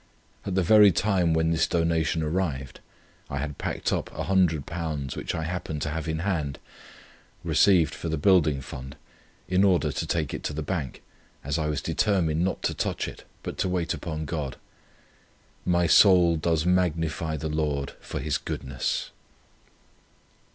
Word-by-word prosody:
At 95 - -2
the 95 - +3
very 105 +2 +7
time 90 -3 +2
when 80 0 +2
this 80 - +2
donation 85 -1 +1
arrived, 75 -5 -2 0.5
I 70 - -3
had 75 0 -4
packed - - -2
up - - -2
£100 80 -5 -1
which - - -3
I 80 - -2
happened 80 -3 -4
to 75 - -2
have 80 +1 -4
in 80 0 -2
hand; 75 -9 -1 0.9
received 85 -6 +4
for 85 - -5
the 80 - -1
Building 75 -4 +3
Fund, 65 +1 -8 0.5
in 95 +1 +3
order 90 -6 +3
to - - -3
take 80 -4 -1
it - - -4
to - - -2
the 80 +1 -3
Bank, 75 -6 -4 0.4
as 70 +4 -1
I 75 - 0
was 75 -1 -2
determined 85 -6 +1
not 95 - -2
to - - 0
touch - - -2
it, - - -10 0.2
but - - -6
to 95 - +1
wait 90 -2 -1
upon 80 -2 -4
God. 75 -4 -4 1.1
My 90 -1 +3
soul 90 -1 +6
does 80 0 0
magnify 85 -3 0
the 80 +2 -4
Lord 75 -3 -1
for - - -5
His 75 -2 -1
goodness. 65 -1 -3
80 Hz, 160 wpm, -26 LUFS, 75-90 Hz, 1.1 s, very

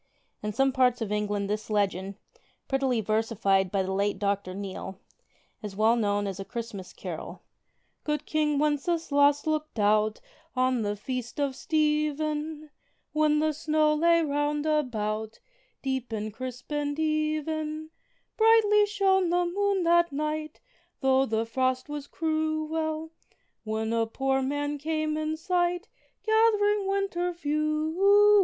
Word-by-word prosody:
In 210 - -2
some 270 +5 +2
parts 250 -1 +3
of 220 -3 -3
England 205 -1 -1
this 210 +2 -3
legend, 195 -2 0 0.5
prettily 270 -4 +1
versified 215 -3 +1
by 195 -1 +1
the 190 - -3
late 200 +1 0
Dr. 200 -2 -1
Neale, 190 -1 -6 0.6
is 205 -2 -7
well 220 +3 +4
known 205 -3 0
as 195 -1 -4
a - - -3
Christmas 210 -4 -6
carol: - - -7 0.6
Good 300 -1 -2
King 300 -1 +1
Wenceslaus 290 -1 +2
looked 310 -3 -2
out 215 +1 +2 0.4
on 255 -1 +2
the 205 -1 -1
Feast 250 +5 -5
of 280 -2 0
Stephen, 305 0 -1 0.4
When 305 0 +3
the 310 0 +1
snow 305 0 +2
lay 335 +2 +4
round 290 0 0
about, 220 -8 -1 0.4
deep 265 -3 -2
and 215 -1 -3
crisp 250 +3 -7
and 290 0 -1
even; 310 0 -1 0.5
Brightly 440 -2 +5
shone 385 -3 +2
the 355 +1 +2
moon 395 +1 0
that 345 0 +4
night, 305 +1 -3 0.4
though 265 0 +3
the 225 +1 0
frost 255 +3 -1
was 295 -1 -5
cruel, 315 0 -2 0.5
When 220 +1 -2
a 230 -1 +1
poor 270 +3 0
man 290 +2 -2
came 310 +1 -1
in 310 0 -2
sight 355 +3 0 0.4
gath'ring 420 -2 +3
winter 390 -3 0
fuel. 330 +7 +3
295 Hz, 135 wpm, -27 LUFS, 225-315 Hz, 0.6 s, Brightly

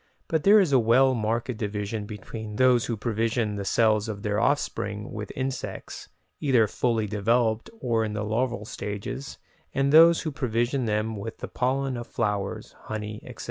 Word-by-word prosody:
but 160 -2 0
there 210 +2 +7
is 185 -7 +2
a 135 - +5
well 125 +4 +4
marked 115 +2 -1
division 105 0 -3
between 105 +1 -7
those 125 0 +4
who 115 - -2
provision 115 0 0
the 100 - -3
cells 110 +1 +2
of 100 -1 -6
their 105 -1 0
offspring 105 -6 -1
with 105 -1 -6
insects, 130 0 -5 0.3
either 130 -6 +4
fully 115 +1 0
developed 110 - +1
or 115 -2 +1
in 105 -1 -3
the 105 0 -2
larval 115 +1 -1
stages, 105 +6 -5 0.4
and 140 +1 +2
those 165 +1 +8
who 155 - -2
provision 125 0 -1
them 110 +1 -1
with 105 +2 -6
the - - -6
pollen 130 +1 -1
of 120 - -6
flowers, 100 -2 -2
honey, 105 -1 -5
etc. - - -11
115 Hz, 170 wpm, -26 LUFS, 105-130 Hz, 0.4 s, those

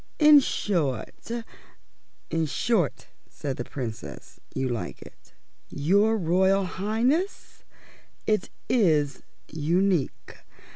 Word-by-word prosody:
In 300 -1 +8
short 160 - -2 0.5
" - - -40
"In 165 -1 +1
short," 185 - 0 0.2
said 135 -3 -5
the 120 - -3
Princess, 120 -3 -7
"you 130 0 -1
like 120 -3 -4
it." - - -18 0.4
"Your 200 +9 +3
Royal 190 +2 +3
Highness, 230 - -1 0.6
it 215 -1 +1 0.2
is 155 - +2 0.3
unique. 170 +1 0
180 Hz, 95 wpm, -26 LUFS, 145-215 Hz, 0.6 s, In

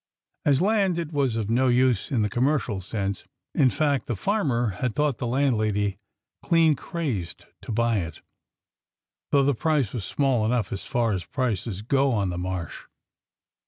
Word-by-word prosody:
As 145 +2 +3
land, 195 -4 +2
it 165 -2 -4
was 135 -5 +1
of 110 -3 -1
no 125 +4 +2
use 125 -3 +2
in 120 -6 +1
the - - +2
commercial 125 -4 0
sense 100 0 -3
— - - -60
in 130 - +4
fact, 145 0 0
the 120 - -1
farmer 130 - 0
had 125 -4 -1
thought 150 -4 +1
the 125 - -2
landlady 110 -6 +1 0.4
clean 165 -3 +4
crazed 130 - -4 0.2
to - - -7
buy 115 -1 +1
it, 85 -2 -6 1.1
though 140 -1 +4
the 140 +1 +3
price 145 -4 0
was 115 - -3
small 130 0 +1
enough 115 -2 0
as 100 - -5
far 120 -2 0
as 95 -4 -2
prices 110 -5 -2
go 135 +3 +2
on 100 -4 0
the 90 - -4
Marsh. 90 -3 -4
120 Hz, 170 wpm, -25 LUFS, 105-140 Hz, 1.1 s, in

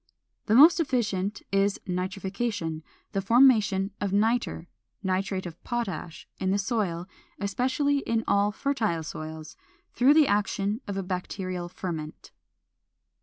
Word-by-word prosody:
The 215 - +3
most 315 +7 +8
efficient 210 - -1
is 195 0 +2
nitrification, 185 -2 -3 0.3
the 195 - -1
formation 215 -3 +4
of 200 -2 -1
nitre 220 -3 +1 0.4
(nitrate 190 0 -1
of 175 -1 -9
potash) 190 -9 -4
in 190 - 0
the 195 - +2
soil, 190 -5 -1 0.3
especially 260 +8 +1
in 230 -4 -1
all 200 +1 +3
fertile 215 - -1
soils, 155 0 -7 0.4
through 265 +5 +5
the 310 -3 +6
action 205 +2 0
of 200 -1 -3
a 195 - -2
bacterial 180 -1 -4
ferment. 160 -4 -6
200 Hz, 120 wpm, -27 LUFS, 185-230 Hz, 0.4 s, most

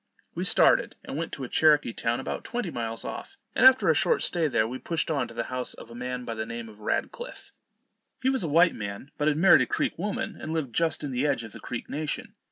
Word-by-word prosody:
We - - -3
started, - - +4
and - - -6
went 165 +2 -3
to 140 - -5
a - - -4
Cherokee 150 -4 +3
town 115 +1 -1
about 130 - -4
twenty 240 -7 -3
miles 115 -3 -4
off; - - -7 0.2
and 255 - +7
after 260 0 +5
a - - +6
short 475 - +2
stay 170 -3 +2
there, 115 -6 +1
we 130 +3 -6
pushed 165 -1 -1
on 140 -5 0
to 115 - -13
the 115 - -1
house 125 0 -2
of 115 - -12
a - - -9
man 125 +1 -5
by 115 - -4
the 110 0 -3
name 115 0 -6
of 105 -1 -15
Radcliff. 485 - -4 0.7
He 260 - +3
was 265 - 0
a 165 - -1
white 170 +4 +5
man, 100 +5 -7
but 150 - +1
had 150 -1 +2
married 190 +4 +7
a - - +1
Creek - - -1
woman, 205 +2 -3
and 155 - -4
lived 145 -7 -2
just 160 0 +1
in 145 - -3
the 130 +3 0
edge 135 -5 0
of 115 - -9
the - - -10
Creek 120 - -6
nation. 180 - -4
145 Hz, 255 wpm, -27 LUFS, 115-165 Hz, 0.7 s, and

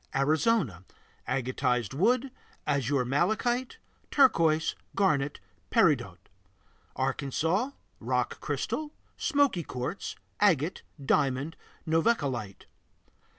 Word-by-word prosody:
Arizona 145 - +2 0.4
Agatized 125 -3 0
wood, 245 - +2 0.4
azur 140 -2 +1
malachite, 220 - 0 0.3
turquoise, 165 - +4 0.2
garnet, 145 -7 +1 0.3
peridot. - - +3 0.8
Arkansas 150 - 0 0.3
Rock - - -1
crystal, 305 -1 -3 0.2
smoky 285 - +2
quartz, 130 +5 -5 0.2
agate, 175 -5 +2 0.2
diamond, 140 +3 +1 0.3
novaculite. 140 - 0
155 Hz, 70 wpm, -29 LUFS, 135-215 Hz, 0.8 s, turquoise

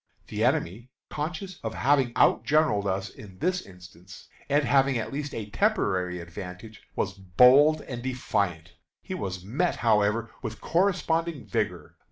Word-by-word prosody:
The - - -2
enemy, 110 +9 0 0.2
conscious 175 +5 -5
of 110 -1 -4
having 135 -2 +2
outgeneraled 145 -10 +3
us 95 0 -2
in 95 -3 -13
this 180 - 0
instance, 90 +1 -14 0.2
and 145 +1 +3
having 135 -2 +3
at 115 - -4
least 145 +1 -3
a 105 -2 -6
temporary 95 - 0
advantage, 90 +5 -9
was 100 - -1
bold 125 - +5
and 120 -2 -7
defiant. 100 -10 -2 0.3
He - - -6
was 95 -2 -5
met, 150 - 0
however, 110 0 +1
with 110 -4 -6
corresponding 170 -4 0
vigor. - - -3
115 Hz, 140 wpm, -27 LUFS, 95-145 Hz, 0.3 s, bold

